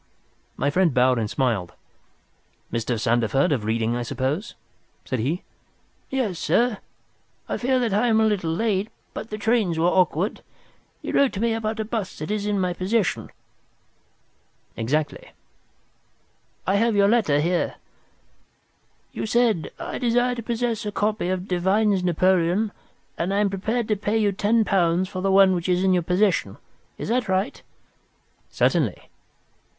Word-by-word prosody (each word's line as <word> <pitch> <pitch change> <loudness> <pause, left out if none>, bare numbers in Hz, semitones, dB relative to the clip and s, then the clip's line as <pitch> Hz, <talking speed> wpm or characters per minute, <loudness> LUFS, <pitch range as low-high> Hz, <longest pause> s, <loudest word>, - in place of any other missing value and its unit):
My 140 - 0
friend 175 -3 +2
bowed 125 -1 +4
and 110 -2 -2
smiled. 110 -10 -1 1.0
"Mr. 115 0 -1
Sandeford, 120 +5 +2
of 120 -7 0
Reading, 115 +1 0
I 120 - -2
suppose?" 135 - -3 0.5
said 130 - -2
he. 150 +11 -1 0.7
"Yes, 235 -10 -1
sir, 225 +6 +1 0.7
I - - -2
fear 260 +1 +1
that 240 -5 0
I 215 +5 +2
am 220 -1 +3
a 220 - +4
little 200 -6 0
late, 205 +3 0 0.2
but 225 - -6
the 215 - -4
trains 215 -6 +1
were 165 - +2
awkward. 180 +2 +1 0.6
You - - -4
wrote 280 -2 +3
to 195 - -4
me 230 +1 +1
about 220 0 -3
a 220 - -1
bust 215 -4 -4
that 155 - -5
is 210 -1 -1
in 205 -1 0
my 180 -1 0
possession." 190 +2 -1 1.5
"Exactly." 145 +7 -2 1.3
"I 195 +3 +2
have 230 +1 +2
your 200 0 +4
letter 205 -10 +3
here. 175 +4 0 1.4
You - - -4
said, 225 -7 +2
'I - - -5
desire 245 0 +2
to 240 - -5
possess 235 -1 -2
a 210 - -3
copy 210 -2 -1
of 185 0 -2
Devine's 190 +2 +2
Napoleon, 185 +3 +2 0.5
and 175 +3 -1
am 200 0 +1
prepared 220 +4 -1
to 215 - +3
pay 205 +2 -1
you 210 -2 +2
ten 215 +3 +2
pounds 180 -2 +2
for 185 - -5
the 195 0 +1
one 195 -1 +6
which 175 0 -2
is 180 +1 +2
in 190 -1 +3
your 180 - +2
possession.' 180 +4 +1 0.4
Is - - -5
that 240 -3 0
right?" 190 +2 -1 0.9
"Certainly." - - 0
190 Hz, 155 wpm, -24 LUFS, 165-220 Hz, 1.5 s, one